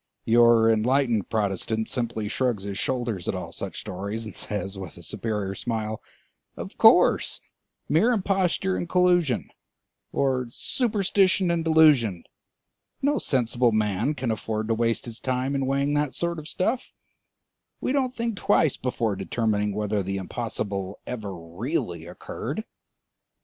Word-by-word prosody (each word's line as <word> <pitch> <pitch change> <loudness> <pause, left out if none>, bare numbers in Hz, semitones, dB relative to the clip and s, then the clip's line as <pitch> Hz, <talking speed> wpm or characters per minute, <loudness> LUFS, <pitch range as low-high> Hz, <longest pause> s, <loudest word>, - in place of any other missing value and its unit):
Your 115 -1 +6
enlightened 115 0 +2
Protestant 110 +1 -1
simply 115 -3 -2
shrugs 115 -2 0
his 100 -1 -4
shoulders 120 -8 -2
at - - 0
all - - -5
such - - -5
stories, 100 +5 -5
and 105 - -7
says 105 -1 -4
with 95 -5 -8
a - - -11
superior 105 -4 -3
smile: 110 0 -3 0.6
"Of - - -7
course, - - +5 0.5
mere 170 +11 +4
imposture 190 -3 +1
and 175 - -3
collusion, 175 -7 +2 0.6
or 130 -2 +1
superstition 195 - +1
and 170 -1 0
delusion; 150 - +4 0.8
no 290 +1 +2
sensible 120 -2 +2
man 110 +6 +1
can 125 -3 -1
afford 110 0 -3
to - - +3
waste 115 0 0
his 115 -2 -7
time 130 +1 -1
in 135 -1 0
weighing 140 +2 +1
that 145 -2 0
sort 170 -1 -2
of 155 - -9
stuff; 225 +10 -1 0.9
we - - -1
don't 260 -2 0
think 230 -2 -2
twice 180 -9 +2
before 115 -5 -1
determining 105 +1 0
whether 105 0 -1
the 95 +1 -3
impossible 100 -2 -4
ever 110 -5 -5
really 85 - -4
occurred." 90 - -5
120 Hz, 140 wpm, -25 LUFS, 105-155 Hz, 0.9 s, Your